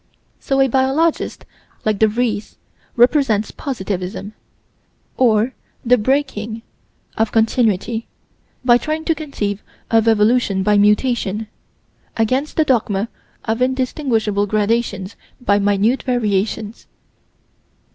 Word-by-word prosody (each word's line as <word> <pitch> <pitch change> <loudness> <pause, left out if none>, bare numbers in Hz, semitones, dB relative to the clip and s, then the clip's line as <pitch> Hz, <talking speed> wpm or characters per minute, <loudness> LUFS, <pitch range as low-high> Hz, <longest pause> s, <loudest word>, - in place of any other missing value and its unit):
So 270 0 -1
a 270 - +5
biologist 270 +6 0 0.4
like 215 -2 +1
De 220 - +5
Vries 215 -1 -2 0.4
represents 240 -4 +3
positivism, 200 -5 -5 0.8
or 235 0 +2 0.3
the 250 0 +4
breaking 230 -3 -1 0.6
of 220 -1 +1
Continuity, 225 -1 +1 0.6
by 240 -1 +6
trying 310 +2 -3
to 330 - +2
conceive 215 -11 -4 0.3
of 225 -1 +3
evolution 215 -2 +3
by 210 +1 +3
mutation 210 0 +2 0.7
against 255 +6 0
the 315 - +3
dogma 220 -5 0 0.4
of 225 +2 -1
indistinguishable 250 -5 0
gradations 215 -1 -1 0.2
by 205 -5 +2
"minute 205 +5 +2
variations." 215 -3 -2
225 Hz, 100 wpm, -19 LUFS, 210-255 Hz, 0.8 s, by